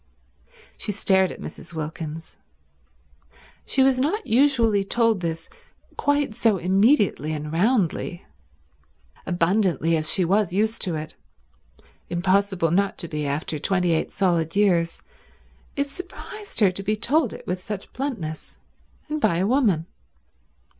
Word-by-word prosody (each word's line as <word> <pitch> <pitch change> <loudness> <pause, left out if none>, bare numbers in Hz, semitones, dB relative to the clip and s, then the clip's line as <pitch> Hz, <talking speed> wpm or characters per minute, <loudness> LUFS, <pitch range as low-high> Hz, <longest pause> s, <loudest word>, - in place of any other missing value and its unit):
She - - -2
stared 190 -2 +2
at - - -9
Mrs. 170 - -9
Wilkins. 160 +1 -6 1.3
She 265 - +3
was 265 -1 +3
not 360 +11 0
usually 230 -5 +3
told 230 0 +2
this 165 -1 -4 0.5
quite 285 -4 +1
so 215 -2 +2
immediately 190 - +2
and 150 0 -5
roundly. 180 -3 0 1.0
Abundantly 175 -1 +1
as 155 0 +2
she 185 - +2
was 195 0 +1
used 220 +3 0
to 175 -3 -2
it— 155 0 -6 1.0
impossible 185 -1 +1
not 195 +3 +1
to 170 - -6
be 150 -2 -3
after 150 +2 -3
twenty 180 +1 +1
eight 160 - 0
solid 170 -4 0
years—it 200 +8 -2
surprised 365 - -8
her 195 -3 +5
to 185 - -7
be 210 +2 0
told 255 +4 +1
it - - -10
with 180 +1 -3
such 200 0 -7
bluntness, 205 - -5 0.5
and 305 0 -3
by 170 - +2
a 185 - +1
woman. 210 - +2
190 Hz, 130 wpm, -24 LUFS, 165-230 Hz, 1.3 s, her